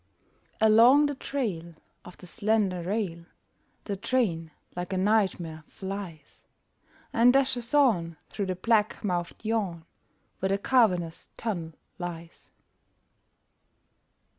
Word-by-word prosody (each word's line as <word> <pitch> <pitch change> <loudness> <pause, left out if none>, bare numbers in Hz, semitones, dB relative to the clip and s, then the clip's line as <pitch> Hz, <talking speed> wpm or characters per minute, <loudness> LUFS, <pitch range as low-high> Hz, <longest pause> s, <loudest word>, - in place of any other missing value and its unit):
Along 230 +7 +6
the 290 - 0
trail 200 - -4 0.3
Of 180 - -12
the - - -13
slender 205 -2 0
rail 175 -3 -3 0.6
The 200 - -3
train, 190 -7 0 0.3
like 180 +2 -4
a - - 0
nightmare, 185 -6 +1
flies 190 -5 -8 0.7
And 235 +2 +6
dashes 260 -3 +1
on 180 - +3
Through 200 -2 -4
the 185 - -1
black 215 +2 +1
mouthed 175 +1 -3
yawn 200 -7 -1 0.5
Where 190 - 0
the 195 - +2
cavernous 185 -8 +1
tunnel 175 -8 -3 0.3
lies. 170 -2 -8
195 Hz, 110 wpm, -27 LUFS, 170-225 Hz, 0.7 s, Along